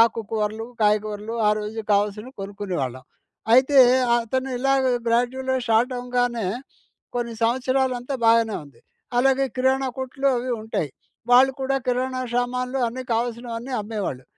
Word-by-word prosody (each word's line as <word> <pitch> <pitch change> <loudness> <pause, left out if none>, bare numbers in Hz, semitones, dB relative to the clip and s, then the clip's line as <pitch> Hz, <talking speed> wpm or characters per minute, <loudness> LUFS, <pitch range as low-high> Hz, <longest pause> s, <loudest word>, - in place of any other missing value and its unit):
ఆకు 230 0 +1
కూరలు, 220 0 -2
కాయగూరలు 210 +1 0
ఆ - - +5
రోజు 215 +1 -4
కావాల్సినవి 210 +4 0
కొనుక్కునేవాళ్ళం. 185 -11 -4 0.5
అయితే 265 +3 +5 0.4
అతను 260 +3 -1
ఇలాగ 270 +1 +2 0.2
గ్రాడ్యువల్‌గా 260 +3 +1
స్టార్ట్ 230 +3 +3
అవ్వగానే 245 -3 -1 0.7
కొన్ని 235 -1 -2
సంవత్సరాలంతా 255 +2 0
బాగానే 225 -1 +4
ఉంది. 140 -5 -19 0.4
అలాగే 270 +1 +3
కిరాణా 265 +1 +2
కొట్లు 265 +1 -3
అవి 250 +1 -4
ఉంటాయి. 220 -8 -2 0.4
వాళ్ళు 260 +2 +7
కూడా 270 +1 0
కిరాణా 255 +1 0
సామాన్లు 250 +1 -1
అన్ని 255 +3 -6
కావాల్సిన 235 +1 -2
అవన్నీ 235 +3 -5
అమ్మేవాళ్ళు. 205 - -4
240 Hz, 125 wpm, -23 LUFS, 215-260 Hz, 0.7 s, వాళ్ళు